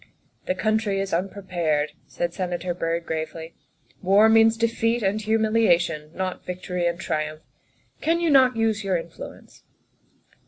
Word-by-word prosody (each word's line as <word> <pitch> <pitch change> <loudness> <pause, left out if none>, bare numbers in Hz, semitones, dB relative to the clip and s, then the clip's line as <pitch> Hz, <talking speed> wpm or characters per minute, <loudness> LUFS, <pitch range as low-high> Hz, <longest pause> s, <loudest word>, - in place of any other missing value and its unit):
" - - -40
The 185 - +1
country 215 0 0
is 195 -2 -3
unprepared," 175 -5 -1 0.2
said 170 -1 -3
Senator 180 -1 -3
Byrd 170 -1 -2
gravely; 160 +1 -5 0.3
" - - -40
war 200 +4 +5
means 225 0 +5
defeat 230 0 0
and 200 +2 0
humiliation, 215 -8 +2
not 185 -1 -3
vic 180 0 -6
tory 180 -1 -1
and 170 0 -2
triumph. 155 -3 -3 0.6
Can 330 +2 +2
you 335 -2 +1
not 255 -3 +5
use 220 -2 +1
your 190 -2 +1
influence 165 0 -10
190 Hz, 150 wpm, -24 LUFS, 170-220 Hz, 0.6 s, war